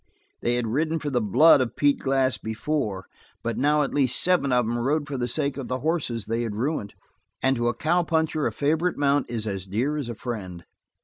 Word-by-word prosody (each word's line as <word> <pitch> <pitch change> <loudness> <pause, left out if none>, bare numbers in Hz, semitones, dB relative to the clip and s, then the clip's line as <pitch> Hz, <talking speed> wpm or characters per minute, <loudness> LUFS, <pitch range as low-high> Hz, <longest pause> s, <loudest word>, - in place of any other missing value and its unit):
They 120 - +1
had 120 -1 -1
ridden 155 +8 0
for 150 -2 -4
the 125 -2 +1
blood 140 - +6
of 125 - -2
Pete 145 -1 +2
Glass 135 -1 +1
before, 110 -4 -3 0.4
but 115 0 -2
now 150 +2 +2
at 140 - -3
least 130 -3 +3
seven 180 -7 +2
of 125 -1 +3
them 120 +2 -1
rode 145 +4 0
for 145 - -4
the 120 -2 -1
sake 140 +2 -1
of 135 - -5
the 130 0 -3
horses 140 - -1
they 115 +2 -1
had 115 -3 -3
ruined, 110 -4 -2 0.5
and 135 0 +3
to 120 -1 0
a 120 - 0
cow 175 +5 +2
puncher 160 -2 0
a - - -2
favorite 160 +9 0
mount 145 -1 +1
is 115 -2 -3
as 95 -3 -4
dear 125 +10 -1
as 140 -5 -4
a 120 - -5
friend. 95 -8 -6
130 Hz, 225 wpm, -25 LUFS, 115-150 Hz, 0.5 s, blood